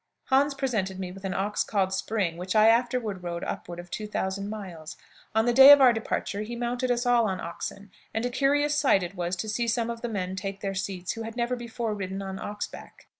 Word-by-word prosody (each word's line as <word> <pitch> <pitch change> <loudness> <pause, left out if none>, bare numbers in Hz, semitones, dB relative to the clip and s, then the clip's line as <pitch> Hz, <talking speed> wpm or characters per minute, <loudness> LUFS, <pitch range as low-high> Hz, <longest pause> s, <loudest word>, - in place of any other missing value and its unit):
"Hans 275 +1 +4
presented 215 -9 -1
me 185 -1 -4
with 195 +1 -10
an 190 - -2
ox 205 +2 0
called 190 -3 0
'Spring,' 190 -3 -1
which 180 +3 -4
I 215 +1 +7
afterward 230 -4 +1
rode 170 -1 -4
upward 175 0 -5
of 175 0 -10
two 215 - -4
thousand 200 -1 -3
miles. 185 -7 -7 0.4
On 220 0 +3
the 240 - +2
day 265 +3 +10
of 285 - +10
our 255 -3 +7
departure 215 -2 -2
he 225 +3 -5
mounted 245 +2 -2
us 245 0 +1
all 240 -2 +4
on 190 -2 -2
oxen, 195 +4 -6 0.2
and 225 +2 -2
a 245 - -1
curious 290 +3 +2
sight 270 -10 +3
it 175 +1 -5
was 175 -1 -2
to 200 +5 -4
see 235 +3 -1
some 230 0 0
of 230 0 -7
the 240 - -3
men 190 -3 -3
take 195 +1 -5
their 195 -1 -2
seats 190 -2 -3
who 225 - -6
had 225 +1 -6
never 240 +1 0
before 235 -2 -4
ridden 195 -1 -4
on 190 0 -5
ox 205 +1 -4
back. - - -13
210 Hz, 235 wpm, -27 LUFS, 190-240 Hz, 0.4 s, day